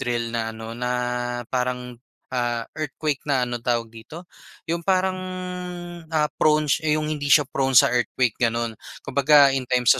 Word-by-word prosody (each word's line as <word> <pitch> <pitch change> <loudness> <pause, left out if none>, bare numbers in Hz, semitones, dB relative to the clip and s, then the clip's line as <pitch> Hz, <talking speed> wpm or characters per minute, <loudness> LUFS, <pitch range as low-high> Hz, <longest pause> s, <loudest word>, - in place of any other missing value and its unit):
drill 120 -1 -2
na 115 -1 -3
ano, 110 0 -7
na 125 +1 -3 0.6
parang, 125 -1 -2 0.3
ah, 120 -2 -1
earthquake 150 -1 -3
na 130 -3 +2
ano, 120 -1 -4
tawag 115 -1 -1
dito, 120 +10 -11 0.4
yung 170 +1 -2
parang 185 +1 +1 0.9
ah 155 -2 0
prone 155 0 +4 0.2
hindi 155 -2 -1
siya 145 +1 +6
prone 135 0 0
sa - - +7
earthquake, 125 -1 +1
gano'n. 115 -1 0 0.3
Kumbaga 140 +1 +5
in 130 -2 -2
times 125 -1 +4
125 Hz, 145 wpm, -23 LUFS, 120-150 Hz, 0.9 s, sa